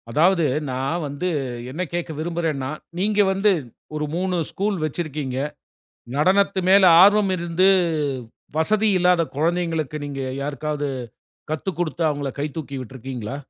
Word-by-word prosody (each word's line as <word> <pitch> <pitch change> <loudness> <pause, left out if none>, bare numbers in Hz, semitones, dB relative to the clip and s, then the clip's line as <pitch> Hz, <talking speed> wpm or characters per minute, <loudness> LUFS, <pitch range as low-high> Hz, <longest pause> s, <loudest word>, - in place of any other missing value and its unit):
அதாவது, 170 +6 +3 0.3
நான் 135 +7 -1
வந்து 145 +6 -3 0.4
என்ன 160 +7 -4
கேட்க 175 -1 -2
விரும்புறேன்னா, 160 -5 -2 0.3
நீங்க 210 +2 +1
வந்து 200 +2 +3 0.4
ஒரு 150 0 -1
3 185 +1 0 0.2
ஸ்கூல் 200 0 -1
வச்சிருக்கீங்க. 150 -4 -3 0.8
நடனத்து 190 +5 +3
மேல 195 +1 +7 0.2
ஆர்வம் 205 0 +5
இருந்து, 175 +2 +2 0.9
வசதி 215 +7 +2
இல்லாத 180 -1 +4
குழந்தைகளுக்கு, 165 -2 0
நீங்க 140 -1 -5 0.2
யாருக்காவது 145 +1 -2 0.6
கத்துக்குடுத்து, 170 0 -2
அவுங்கள 145 -2 -3
கை 145 - 0
தூக்கி 140 -3 -5
விட்டுருக்கீங்களா? 130 -1 -6
165 Hz, 115 wpm, -23 LUFS, 145-185 Hz, 0.9 s, மேல